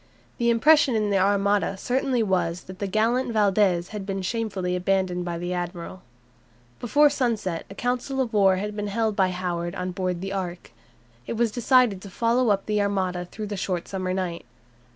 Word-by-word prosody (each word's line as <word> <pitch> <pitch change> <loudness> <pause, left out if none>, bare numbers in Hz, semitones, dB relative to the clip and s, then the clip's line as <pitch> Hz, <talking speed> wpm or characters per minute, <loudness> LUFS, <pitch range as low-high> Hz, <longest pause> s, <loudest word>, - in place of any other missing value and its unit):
The 235 0 +2
impression 270 +2 +5
in 210 -2 +1
the 195 - +3
Armada 200 0 +2
certainly 250 +2 0
was 180 -3 0
that 185 0 -11
the 200 - -2
gallant 230 +5 +1
Valdes 195 -4 +2
had 210 -2 -5
been 195 -1 -4
shamefully 195 -4 -2
abandoned 180 -1 0
by 170 -1 -3
the 175 +1 -3
admiral. 175 +1 -5 0.8
Before 290 +5 +4
sunset 230 - -1
a 195 - -10
council 250 +3 -2
of 245 -3 -1
war 195 -2 +5
had 205 +2 -4
been 210 0 -3
held 220 +1 0
by 190 -3 +3
Howard 175 -1 -3
on 180 -1 -3
board 180 -1 -2
the 195 +1 -4
"Ark." 180 -2 -5 0.6
It - - -2
was 230 -1 +1
decided 240 -4 +3
to 200 - -9
follow 235 +4 +1
up 195 -1 +1
the 210 -1 +1
Armada 185 -3 -1
through 215 +4 -7
the 205 0 -4
short 180 -2 -2
summer 185 -1 -3
night. 180 -2 -3
195 Hz, 185 wpm, -25 LUFS, 185-225 Hz, 0.8 s, impression